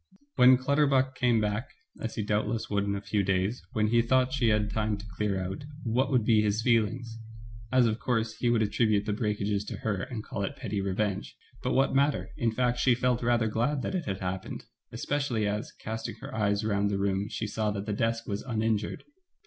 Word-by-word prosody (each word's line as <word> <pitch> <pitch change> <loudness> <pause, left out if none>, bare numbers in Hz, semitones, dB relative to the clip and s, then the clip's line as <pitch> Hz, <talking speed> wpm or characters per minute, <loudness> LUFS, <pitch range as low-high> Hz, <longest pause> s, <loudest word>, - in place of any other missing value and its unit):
When 125 +1 +7
Clutterbuck 135 0 +2
came 120 -3 +2
back, 105 +3 -1 0.3
as 115 - -4
he 110 - -1
doubtless 105 +2 -1
would 100 -1 +1
in 100 0 -1
a 100 - -4
few 100 +1 0
days, 95 +4 0
when 105 -1 +2
he 120 +1 +4
thought 130 +2 +2
she 130 -4 +2
had 105 -1 +3
had 105 - -4
time 110 -1 0
to 100 - -10
clear 100 -3 0
out, 95 +7 -4 0.2
what 125 +2 +1
would 125 -5 +2
be 110 -2 +5
his 105 +1 0
feelings! 115 0 +1 0.5
as, 130 -1 +5
of 110 0 0
course, 115 -3 0
he 120 - +1
would 115 -2 +3
attribute 105 -1 +2
the 105 - -1
breakages 105 -1 -1
to - - -5
her 100 -3 -2
and 110 -1 -5
call 100 - -5
it 100 - -3
petty 100 -2 -3
revenge; 100 +1 -2 0.2
but - - -1
what 135 +1 +3
matter, 140 +1 +1
in 115 -1 0
fact 125 +1 0
she 125 -2 +4
felt 125 0 +1
rather 120 -1 +2
glad 120 +6 0
that - - -2
it 180 -3 -2
had 95 -1 -3
happened, 95 0 -4 0.3
especially 135 -7 -1
as, 105 +1 -2
casting 110 +1 -5
her - - -9
eyes 105 -1 +1
round 100 -1 +1
the 100 - 0
room, 100 0 0
she 110 - -3
saw 110 0 -1
that 100 -1 -3
the 105 - -2
desk 115 +2 0
was 100 -1 -2
uninjured. 110 -3 -1
110 Hz, 215 wpm, -29 LUFS, 105-120 Hz, 0.5 s, When